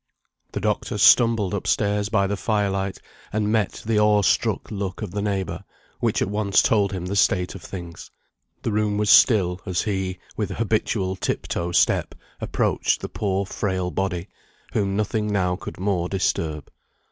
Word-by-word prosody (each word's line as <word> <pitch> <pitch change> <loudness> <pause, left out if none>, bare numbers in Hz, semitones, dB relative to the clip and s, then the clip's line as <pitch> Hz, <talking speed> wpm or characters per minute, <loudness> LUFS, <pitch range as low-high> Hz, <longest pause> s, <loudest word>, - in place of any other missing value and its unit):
The - - -2
doctor - - -1
stumbled 115 -5 +5
up 100 - -3
stairs 105 0 +1
by 105 -3 +2
the 100 +1 -1
fire 105 -1 0
light, 95 0 -2 0.3
and 105 0 0
met 110 -3 0
the 110 -1 +2
awe 105 -1 +4
struck - - +1
look 100 0 -4
of 100 - -5
the 100 +2 -3
neighbour, 100 -3 -2 0.4
which - - +1
at - - -2
once 100 -1 +2
told 100 -3 +2
him 90 -3 -4
the 95 +2 -3
state 90 -2 +2
of - - -9
things. 85 -3 -8 0.5
The - - -1
room 105 -1 0
was 105 0 +2
still, 95 -6 +5
as 90 -1 -1
he, 95 -3 -2 0.2
with 105 -3 -2
habitual 100 -2 -1
tip - - -2
toe 85 +1 -2
step, - - +2 0.2
approached - - 0
the - - -5
poor 100 -1 -1
frail 95 -2 -2
body, 90 +1 -2 0.5
whom 100 -2 0
nothing 105 0 -1
now 90 -3 +1
could 90 - -8
more 90 -3 0
disturb. 80 -5 -2
100 Hz, 170 wpm, -23 LUFS, 95-105 Hz, 0.5 s, stumbled